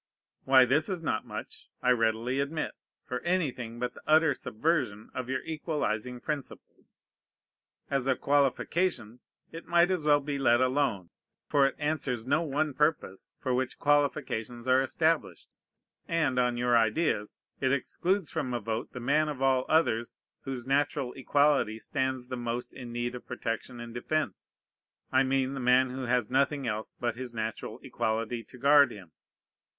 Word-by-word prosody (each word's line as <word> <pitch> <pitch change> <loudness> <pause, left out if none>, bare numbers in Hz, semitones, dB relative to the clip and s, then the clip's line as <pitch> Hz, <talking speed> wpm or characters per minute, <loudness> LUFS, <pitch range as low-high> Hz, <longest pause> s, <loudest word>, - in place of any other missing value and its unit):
Why, 130 -1 +7
this 145 - +1
is 180 -3 -3
not 110 -8 -1
much, - - -8
I 125 - +4
readily 115 +2 +1
admit, 145 +3 -2 0.3
for 125 - -3
anything 135 -10 -1
but 125 0 -3
the - - -13
utter 155 -1 +5
subversion 125 -4 -1
of 130 -1 -5
your 130 0 -1
equalizing 130 -7 -2
principle. 145 +1 -6 1.0
As 135 -2 -1
a 130 - +3
qualification 140 - 0 0.3
it 165 - -9
might 175 +1 +4
as 180 -4 0
well 145 -1 +5
be 140 0 -3
let 120 -3 +4
alone; 130 -8 0 0.4
for 140 -1 +4
it - - -4
answers 145 -6 -2
no 145 +5 +2
one 150 -1 -1
purpose 150 -9 -1
for 130 -3 -1
which 130 0 -1
qualifications 130 -5 0
are 130 +1 +5
established; 160 +4 0 0.6
and, 155 -6 +1
on 125 -1 +1
your 120 0 +2
ideas, 110 -1 +1 0.2
it 130 -1 +1
excludes 175 +6 0
from 130 -6 -2
a - - 0
vote 110 +1 -4
the 125 - -6
man 150 +5 +2
of 145 -4 -5
all 130 -1 +2
others 120 -8 +1 0.3
whose 130 -3 -5
natural 140 -1 0
equality 135 -4 +2
stands 130 +2 -2
the 130 - -5
most 120 0 -4
in 120 -2 -8
need 120 +1 -2
of 125 - -9
protection 120 +1 -4
and 120 -1 -8
defence: 155 +6 -3 0.6
I 130 - +4
mean 135 0 +1
the 135 - -4
man 125 +1 +4
who 130 0 -4
has 125 -2 +1
nothing 140 +1 +1
else 110 -1 -3
but 120 -1 -2
his 125 -2 -7
natural 110 -1 -4
equality 115 +1 -2
to 125 - -14
guard 140 +1 +6
him. 95 -7 -11
130 Hz, 160 wpm, -29 LUFS, 120-145 Hz, 1.0 s, Why